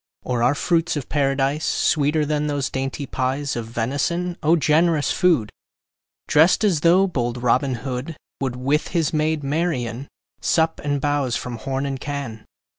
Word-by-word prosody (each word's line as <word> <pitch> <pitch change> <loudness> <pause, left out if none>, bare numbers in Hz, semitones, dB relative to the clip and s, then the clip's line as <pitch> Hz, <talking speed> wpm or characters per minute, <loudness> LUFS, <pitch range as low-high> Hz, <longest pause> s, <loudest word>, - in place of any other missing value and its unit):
Or 125 -2 -1
are 125 +4 +3
fruits 165 +2 +1
of 140 - -6
Paradise 140 +1 0
Sweeter 150 0 +1
than 150 0 -1
those 145 -2 -2
dainty 135 +2 -3
pies 135 +2 -2
Of 115 -2 -4
venison? 140 +10 -1
O 160 +3 +4
generous 155 0 +2
food! 165 - +2 0.8
Drest 160 +7 +4
as 190 -7 +3
though 175 +5 +5
bold 120 -8 -2
Robin 130 +2 +2
Hood 125 +1 -4
10 165 - -7 0.2
Would, 130 -3 -2
with 140 +5 0
his 170 -2 0
maid 155 -1 0
Marian, 140 -5 -2 0.3
Sup 160 0 +1
and 145 -1 0
bowse 145 -3 0
from 120 -1 -4
horn 135 +3 -3
and 135 -1 -3
can. 140 -7 -5
145 Hz, 160 wpm, -22 LUFS, 130-160 Hz, 0.8 s, though